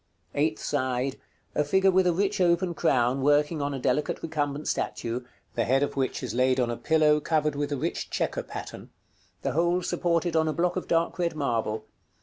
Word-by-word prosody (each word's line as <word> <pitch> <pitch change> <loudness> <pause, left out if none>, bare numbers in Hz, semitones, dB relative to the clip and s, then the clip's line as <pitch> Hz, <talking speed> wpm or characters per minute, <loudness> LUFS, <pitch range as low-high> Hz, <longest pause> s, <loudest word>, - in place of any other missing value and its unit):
Eighth 155 +2 +1
side. 130 -1 -1 0.3
A 150 - +2
figure 190 +6 +3
with 185 0 +3
a - - +4
rich 190 +2 0
open 175 0 +2
crown, 130 -5 +2
working 145 +2 +2
on 140 0 -1
a 140 - -3
delicate 130 +3 -1
recumbent 150 -2 -2
statue, 120 +2 -2 0.3
the 115 - 0
head 135 +4 +2
of 145 - -2
which 135 0 -1
is 125 - -3
laid 130 +1 +2
on 120 -2 +1
a - - -2
pillow 155 +2 +3
covered 150 -1 +1
with 145 0 -2
a 145 - 0
rich - - -3
chequer - - -1
pattern; - - -8 0.5
the - - 0
whole 175 +3 +1
supported 170 -1 0
on 160 0 +3
a 155 - 0
block 175 +2 0
of 185 - -3
dark 165 +2 +1
red 170 -2 0
marble. 115 -6 -1
150 Hz, 195 wpm, -27 LUFS, 130-170 Hz, 0.5 s, a